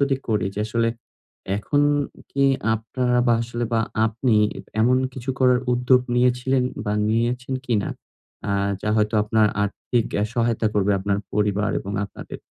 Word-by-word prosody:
যদি 140 Hz, -1 st, +2 dB
করি 105 Hz, -4 st, +1 dB
যে -, -, -1 dB
আসলে 115 Hz, +1 st, +1 dB, 0.7 s
এখন 145 Hz, +7 st, +1 dB, 0.5 s
কি 140 Hz, 0 st, +1 dB, 0.3 s
আপনারা 125 Hz, +3 st, -1 dB
বা 120 Hz, -, +5 dB
আসলে 120 Hz, 0 st, -3 dB
বা 115 Hz, -, +3 dB, 0.3 s
আপনি 115 Hz, +1 st, +1 dB, 0.4 s
এমন 125 Hz, +3 st, +4 dB, 0.2 s
কিছু 130 Hz, 0 st, -4 dB
করার 125 Hz, -1 st, +4 dB
উদ্যোগ 125 Hz, +1 st, +4 dB
নিয়েছিলেন 125 Hz, +1 st, +2 dB, 0.2 s
বা 105 Hz, -, -1 dB, 0.2 s
নিয়েছেন 120 Hz, +3 st, 0 dB
কিনা? 105 Hz, -5 st, 0 dB, 0.6 s
আ -, -, 0 dB, 0.3 s
যা -, -, -3 dB
হয়তো 105 Hz, +1 st, +1 dB
আপনার 110 Hz, 0 st, +3 dB, 0.2 s
আর্থিক 110 Hz, +3 st, -1 dB, 0.2 s
এ -, -, +2 dB
সহায়তা 115 Hz, -2 st, +1 dB
করবে 100 Hz, 0 st, +2 dB
আপনার 100 Hz, +1 st, 0 dB
পরিবার 105 Hz, 0 st, +1 dB
এবং 100 Hz, -, -6 dB
আপনাদের। -, -, -9 dB
115 Hz, 150 wpm, -23 LUFS, 105-125 Hz, 0.7 s, বা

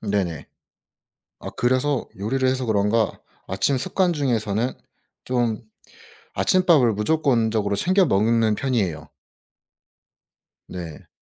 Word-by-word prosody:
네네. 100 Hz, -7 st, -2 dB, 0.9 s
아 -, -, -7 dB
그래서 130 Hz, +3 st, 0 dB
요리를 130 Hz, +6 st, -1 dB
해서 130 Hz, 0 st, 0 dB
그런가 110 Hz, 0 st, +1 dB, 0.3 s
아침 95 Hz, +9 st, 0 dB
습관 175 Hz, +7 st, 0 dB
중에서는 120 Hz, -5 st, -1 dB, 0.5 s
좀 120 Hz, -3 st, -1 dB, 0.7 s
아침밥을 165 Hz, -11 st, +3 dB
무조건적으로 110 Hz, -4 st, +1 dB
챙겨 185 Hz, -, +3 dB
먹는 110 Hz, -, +2 dB
편이에요. 100 Hz, -, -2 dB, 1.6 s
네. 85 Hz, -4 st, -8 dB
115 Hz, 225 characters per minute, -23 LUFS, 100-130 Hz, 1.6 s, 아침밥을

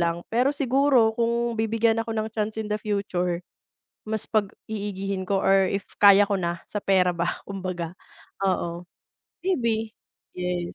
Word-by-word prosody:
lang, 170 Hz, 0 st, 0 dB
pero 250 Hz, +4 st, +3 dB
siguro 270 Hz, -4 st, +3 dB
kung 235 Hz, 0 st, 0 dB
bibigyan 225 Hz, 0 st, +2 dB
ako 225 Hz, 0 st, -3 dB
ng 220 Hz, 0 st, -2 dB
chance 215 Hz, 0 st, -2 dB
in 215 Hz, -1 st, -3 dB
the 210 Hz, -, -1 dB
future 180 Hz, -4 st, -1 dB, 0.6 s
mas 220 Hz, 0 st, -2 dB
pag-iigihin 200 Hz, -2 st, -2 dB
ko 195 Hz, +1 st, 0 dB
or 195 Hz, 0 st, +4 dB
if 200 Hz, 0 st, -3 dB
kaya 200 Hz, 0 st, +7 dB
ko 200 Hz, -, +1 dB
na 170 Hz, -2 st, -2 dB
sa 210 Hz, -, -4 dB
pera 180 Hz, -2 st, +3 dB
ba, 170 Hz, 0 st, -1 dB
kumbaga 185 Hz, -3 st, -4 dB, 0.5 s
oo 175 Hz, -2 st, -1 dB, 0.6 s
maybe, 230 Hz, -11 st, 0 dB, 0.4 s
yes. 180 Hz, -1 st, -3 dB
205 Hz, 145 wpm, -25 LUFS, 185-225 Hz, 0.6 s, kaya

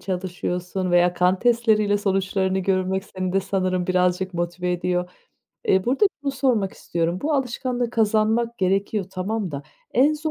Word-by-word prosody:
çalışıyorsun 180 Hz, 0 st, -3 dB
veya 175 Hz, 0 st, +4 dB
kan 180 Hz, +1 st, +2 dB
testleriyle 220 Hz, -3 st, +3 dB
sonuçlarını 190 Hz, -1 st, 0 dB
görmek 190 Hz, 0 st, 0 dB
seni 185 Hz, -2 st, -4 dB
de 195 Hz, -, +2 dB
sanırım 185 Hz, -2 st, -1 dB
birazcık 180 Hz, 0 st, +1 dB
motive 175 Hz, +1 st, -2 dB
ediyor. 180 Hz, 0 st, -1 dB, 0.6 s
Eee, 190 Hz, 0 st, +4 dB
burada 265 Hz, -, +2 dB, 0.2 s
şunu 280 Hz, -, 0 dB
sormak 250 Hz, -8 st, +1 dB
istiyorum. 170 Hz, +1 st, -2 dB
Bu 310 Hz, -, 0 dB
alışkanlığı 250 Hz, -2 st, -1 dB
kazanmak 225 Hz, +1 st, +1 dB
gerekiyor, 195 Hz, +2 st, 0 dB
tamam 195 Hz, +1 st, -3 dB
da 140 Hz, -1 st, -5 dB, 0.3 s
en 275 Hz, +5 st, +5 dB
zor 310 Hz, +1 st, -3 dB
190 Hz, 145 wpm, -23 LUFS, 180-225 Hz, 0.6 s, en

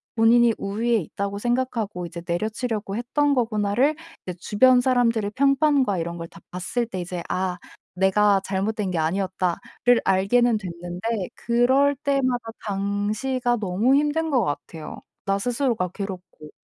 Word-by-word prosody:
본인이 235 Hz, +1 st, +5 dB
우위에 225 Hz, +4 st, 0 dB
있다고 200 Hz, +2 st, -4 dB
생각하고 235 Hz, -6 st, -1 dB
이제 170 Hz, 0 st, -8 dB
내려치려고 215 Hz, +3 st, -2 dB
했던 285 Hz, +5 st, +1 dB
거구나.'를 230 Hz, +4 st, +1 dB, 0.3 s
이제 180 Hz, -1 st, -5 dB
주변 250 Hz, +7 st, +4 dB
사람들의 235 Hz, -5 st, +1 dB
평판과 275 Hz, -5 st, +3 dB
이런 170 Hz, +1 st, -4 dB
걸 165 Hz, 0 st, -6 dB
다 -, -, -15 dB
봤을 185 Hz, +7 st, -2 dB
때 190 Hz, -5 st, -5 dB
이제 175 Hz, 0 st, -5 dB
'아 185 Hz, -1 st, -1 dB, 0.4 s
내가 195 Hz, +2 st, +3 dB
잘못된 200 Hz, +1 st, -1 dB
게 175 Hz, -, -2 dB
아니었다.'를 185 Hz, +7 st, 0 dB
알게는 215 Hz, +5 st, +3 dB
됐는데 180 Hz, +2 st, -4 dB
그럴 260 Hz, +4 st, +3 dB
때마다 255 Hz, -4 st, 0 dB
당시가 210 Hz, +5 st, -1 dB
너무 210 Hz, +5 st, +2 dB
힘든 300 Hz, +3 st, +1 dB
것 255 Hz, -4 st, +3 dB
같아요 150 Hz, +2 st, -5 dB, 0.3 s
나 195 Hz, 0 st, +1 dB
스스로가 235 Hz, -4 st, 0 dB
괴롭고. 185 Hz, -5 st, -8 dB
215 Hz, 315 characters per minute, -24 LUFS, 190-245 Hz, 0.4 s, 본인이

